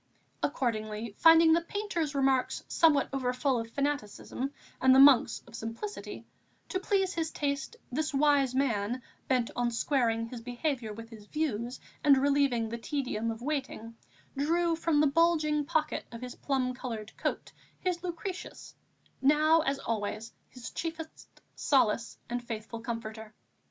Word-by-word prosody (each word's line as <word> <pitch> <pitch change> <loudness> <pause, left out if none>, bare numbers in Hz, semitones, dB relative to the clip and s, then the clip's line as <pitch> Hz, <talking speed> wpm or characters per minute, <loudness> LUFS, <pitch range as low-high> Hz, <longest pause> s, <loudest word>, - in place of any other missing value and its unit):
Accordingly, 215 -5 -2
finding 325 0 +7
the 335 - +3
painter's 335 -5 -3
remarks 265 -2 +1
somewhat 305 -4 +4
overfull 255 0 0
of 230 0 -5
fanaticism, 275 -1 -3 0.3
and 260 0 +6
the - - +7
Monk's 275 -3 +6
of 235 - -17
simplicity, 230 - -6 0.4
to 375 - -1
please 385 -1 +1
his 325 -2 -1
taste, 280 -2 -2 0.2
this 305 +4 -1
wise 280 -2 +3
man, 240 -2 0 0.2
bent 250 -3 +1
on 245 0 +1
squaring 230 -2 +1
his 230 0 -8
behaviour 245 -1 -2
with 225 +2 -9
his 210 -2 -12
views 250 -5 -2 0.2
and 285 -3 +6
relieving 275 -4 +2
the 235 +1 -5
tedium 230 -4 -2
of 225 +1 -5
waiting, 265 -6 -3 0.4
drew 335 +4 +1
from 325 -2 +2
the - - +5
bulging 305 -1 +2
pocket 305 0 0
of 230 0 -8
his 250 0 -6
plum 260 -3 -1
coloured 225 -4 -6
coat - - -3 0.3
his 360 -2 -1
Lucretius, 365 +1 -6 0.5
now 305 +4 +5
as 275 -3 0
always 220 -1 -3 0.2
his 250 -1 -9
chiefest 325 -1 -6 0.2
solace 235 -5 +1
and 245 0 -3
faithful 230 -1 -6
comforter. 220 -2 -6
265 Hz, 140 wpm, -30 LUFS, 230-305 Hz, 0.5 s, finding